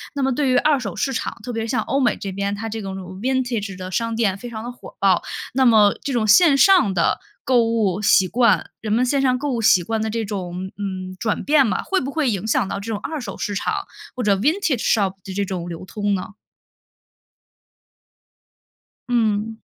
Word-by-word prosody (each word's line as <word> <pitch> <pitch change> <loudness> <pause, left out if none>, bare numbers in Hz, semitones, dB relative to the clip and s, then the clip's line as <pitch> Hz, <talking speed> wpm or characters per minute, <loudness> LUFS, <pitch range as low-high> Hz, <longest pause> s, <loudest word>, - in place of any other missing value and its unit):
那 280 - -1
么 265 0 +1
对 275 +1 0
于 255 - +3
二 300 +3 +3
手 200 -7 -5
市 270 - -1
场， - - -3
特 245 - -5
别 225 -1 -2
是 225 - -5
像 250 - +1
欧 275 - -1
美 245 -4 +2
这 200 - -5
边， 200 +1 -2
它 225 +2 -5
这 220 0 -5
种 195 -1 -5 0.3
vintage 245 -6 -1
的 185 0 -6
商 230 +4 -1
店 210 -4 +1
非 240 +4 -8
常 220 -2 -7
的 245 - -5
火 245 - -13
爆。 190 -3 +3 0.3
那 265 +1 +2
么 215 -4 +5
这 280 - -2
种 225 -3 +1
线 280 - +6
上 365 - +5
的， 170 -2 +1 0.3
购 250 -2 +4
物 215 -4 0
习 190 -2 +5
惯 235 +1 +2
人 215 -1 -2
们 245 +3 +3
线 275 +2 +1
上 255 -2 +2
购 290 +2 -2
物 235 -2 -1
习 185 -5 +5
惯 225 +4 -2
的 220 - -1
这 225 +1 -2
种， 185 -2 -5
嗯， 185 -2 -5
转 220 -3 -1
变 290 -2 +4
嘛， - - -1
会 385 - 0
不 270 - -4
会 295 -3 0
影 205 -1 -2
响 210 - +1
到 - - -3
这 200 - -8
种 215 - -1
二 310 +8 -5
手 215 -7 -7
市 205 - -3
场 - - -1 0.4
或 250 - -3
者 205 -2 +3
vintage 295 - +1
shop 200 -4 +2 0.2
这 200 - 0
种 180 -3 -4
流 165 0 -7
通 205 +1 -1
呢？ 190 +2 -6 2.8
嗯。 220 -2 0
225 Hz, 275 characters per minute, -21 LUFS, 200-255 Hz, 2.8 s, 线